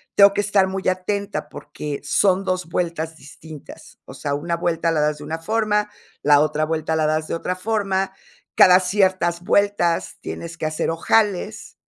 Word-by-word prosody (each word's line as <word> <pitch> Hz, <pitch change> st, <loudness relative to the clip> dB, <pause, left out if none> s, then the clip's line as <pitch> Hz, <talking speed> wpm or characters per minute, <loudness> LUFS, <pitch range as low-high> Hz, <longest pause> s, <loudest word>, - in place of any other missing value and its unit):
tengo 200 Hz, 0 st, +7 dB
que 205 Hz, -, -2 dB
estar 200 Hz, -1 st, +2 dB
muy 190 Hz, 0 st, -4 dB
atenta, 200 Hz, +2 st, -2 dB
porque 145 Hz, 0 st, -7 dB
son 195 Hz, -1 st, +2 dB
2 185 Hz, -2 st, -2 dB
vueltas 165 Hz, -2 st, -3 dB
distintas. 150 Hz, +1 st, -13 dB
O -, -, -11 dB
sea, 140 Hz, -1 st, -3 dB
una 170 Hz, +4 st, -2 dB
vuelta 170 Hz, -1 st, -1 dB
la 155 Hz, -2 st, +1 dB
das 150 Hz, 0 st, 0 dB
de 150 Hz, -, -10 dB
una 160 Hz, +2 st, -4 dB
forma, 210 Hz, +3 st, 0 dB, 0.3 s
la 145 Hz, 0 st, +5 dB
otra 155 Hz, +1 st, +1 dB
vuelta 160 Hz, 0 st, -2 dB
la 155 Hz, -1 st, +1 dB
das 155 Hz, 0 st, -1 dB
de -, -, -2 dB
otra 180 Hz, +2 st, -3 dB
forma, 195 Hz, -2 st, -1 dB, 0.4 s
cada 180 Hz, 0 st, +7 dB
ciertas 185 Hz, -2 st, +1 dB
vueltas 200 Hz, -4 st, +1 dB
tienes 170 Hz, 0 st, -7 dB
que 160 Hz, -, -4 dB
hacer 155 Hz, 0 st, -1 dB
ojales, 205 Hz, +4 st, 0 dB
175 Hz, 170 wpm, -21 LUFS, 160-195 Hz, 0.4 s, tengo